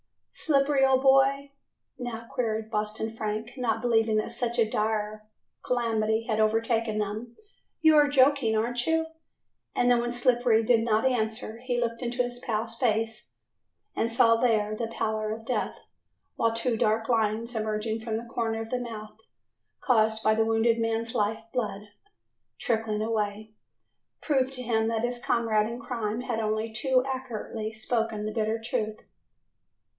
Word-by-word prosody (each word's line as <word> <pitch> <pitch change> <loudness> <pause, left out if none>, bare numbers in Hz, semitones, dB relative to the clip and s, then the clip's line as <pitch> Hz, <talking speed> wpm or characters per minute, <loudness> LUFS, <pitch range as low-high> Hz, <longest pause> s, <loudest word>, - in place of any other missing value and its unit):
"Slippery, 275 -2 +2
old 265 0 +4
boy," 275 +1 +4 0.5
now 235 -2 -5
queried 220 -3 -2
Boston 215 +1 -2
Frank, 220 +1 -4
not 225 -3 0
believing 225 -2 +2
that 215 - -1
such 240 -1 -2
a 230 -2 +4
dire 215 0 -2 0.3
calamity 225 -2 0
had 220 -2 0
overtaken 225 0 +1
them, 215 +3 -4 0.4
"you 315 -1 +6
are 295 -1 +6
joking, 270 -4 +3
aren't 240 +2 -1
you?" 325 0 +2 0.7
And 245 0 +3
then, 240 - +4
when 240 0 -2
Slippery 240 -2 +3
did 230 +1 +4
not 225 +1 +2
answer, 220 -3 -1
he 245 0 -2
looked 230 0 -2
into 245 0 0
his 245 0 -5
pal's 225 -1 -3
face 225 -1 -1 0.6
and 230 - 0
saw 230 0 +4
there 215 -3 +1
the 230 +1 -3
pallor 215 -1 -2
of 225 +1 -6
death 250 - -2 0.6
while 230 0 +2
two 230 +1 0
dark 220 0 +1
lines 225 0 0
emerging 220 0 -2
from 220 -1 -3
the 230 - -6
corner 225 -1 -2
of 225 - -7
his 250 -1 -1
mouth 220 -2 -8 0.6
caused 220 -3 +2
by 215 - +4
the 220 0 +2
wounded 225 +1 +2
man's 225 0 -1
life 220 -1 0
blood, 210 -4 -3 0.7
trickling 220 -2 -1
away, 215 -1 -2 0.7
proved 265 -3 +1
to 255 -1 -6
him 225 -2 +1
that 225 0 -1
his 245 0 -2
comrade 220 -2 +2
in 235 +1 -6
crime 230 -2 -3
had 245 -3 -2
only 220 +1 -1
too 255 +2 +2
accurately 235 -4 -4
spoken 220 -1 -2
the 215 - -2
bitter 220 0 0
truth. 220 -1 -3
225 Hz, 155 wpm, -27 LUFS, 220-245 Hz, 0.7 s, you